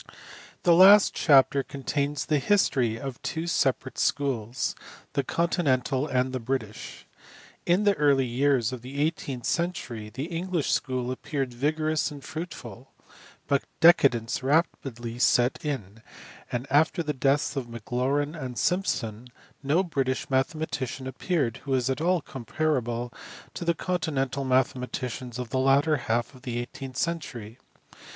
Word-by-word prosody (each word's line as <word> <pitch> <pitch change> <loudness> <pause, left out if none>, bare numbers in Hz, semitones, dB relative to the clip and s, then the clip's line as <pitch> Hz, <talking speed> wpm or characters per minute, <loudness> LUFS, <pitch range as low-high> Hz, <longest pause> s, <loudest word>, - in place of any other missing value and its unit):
THE 175 - +5
last 195 +4 +8
chapter 140 -2 +5
contains 140 +1 -2
the 150 -2 +2
history 130 - +2
of 135 -3 -6
two 160 +1 -3
separate 135 -5 0
schools 125 -4 0 0.4
the 140 - +1
continental 145 -4 0
and 130 -1 0
the 130 - -1
British. 115 -3 -5 0.6
In 180 +4 +3
the 205 -1 +4
early 140 -6 +3
years 130 -1 +1
of 125 - -6
the 135 +3 -7
eighteenth 145 -5 -2
century 125 -11 -2
the 130 +5 -5
English 170 0 -2
school 130 -2 -1
appeared 135 -1 -3
vigorous 155 +5 0
and 145 -3 -10
fruitful, 135 -6 -8 0.5
but 140 -1 +2 0.2
decadence 135 -9 +4
rapidly 130 -5 -1
set 125 0 +3
in, 115 -8 -4 0.5
and 120 +1 -2
after 155 +4 +3
the 150 -1 -2
deaths 140 +1 +1
of 135 -3 -3
Maclaurin 130 +6 -1
and 130 -7 -6
Simpson 125 - -1 0.3
no 150 +7 +2
British 135 -7 -2
mathematician 135 -2 -1
appeared 130 - -1
who 135 0 -2
is 130 +1 +1
at 130 - -3
all 175 0 +2
comparable 120 -3 -2 0.4
to - - -5
the 170 0 +1
continental 145 -7 -2
mathematicians 125 -1 -1
of 125 -2 -5
the 130 - 0
latter 140 +3 +3
half 120 +1 -1
of 130 - -15
the 125 -3 -4
eighteenth 130 +2 -6
century. 130 -9 -4
135 Hz, 135 wpm, -27 LUFS, 125-155 Hz, 0.6 s, last